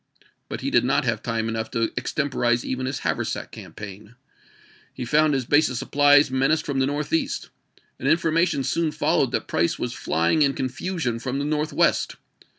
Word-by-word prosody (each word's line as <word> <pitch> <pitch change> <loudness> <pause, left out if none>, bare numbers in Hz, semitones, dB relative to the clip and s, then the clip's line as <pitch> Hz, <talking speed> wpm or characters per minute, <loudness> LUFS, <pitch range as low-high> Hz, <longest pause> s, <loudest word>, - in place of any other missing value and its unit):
But - - -5
he - - -2
did - - +4
not - - +1
have - - 0
time 115 -1 -2
enough 110 -1 -3
to 115 -1 -1
extemporize 125 -2 0
even 130 0 -2
his 130 - -3
haversack - - -2
campaign. 105 +2 -10 0.8
He 125 - -6
found 150 +3 +3
his 130 -2 -1
base 145 +3 +4
of 125 - -4
supplies 145 +1 +4
menaced 135 +4 +1
from 140 -2 -1
the 130 - +2
northeast, 150 +3 -2 0.5
and 135 - 0
infor 165 +1 +2
mation 165 -5 +1
soon 165 +2 0
followed - - +1
that - - -2
Price 85 +1 0
was 120 0 -3
flying 85 - +1
in 140 -2 +3
con 130 - -1
fusion 145 -4 -3
from 130 +1 -3
the 140 - -2
northwest. 150 +1 +1
135 Hz, 180 wpm, -24 LUFS, 120-150 Hz, 0.8 s, did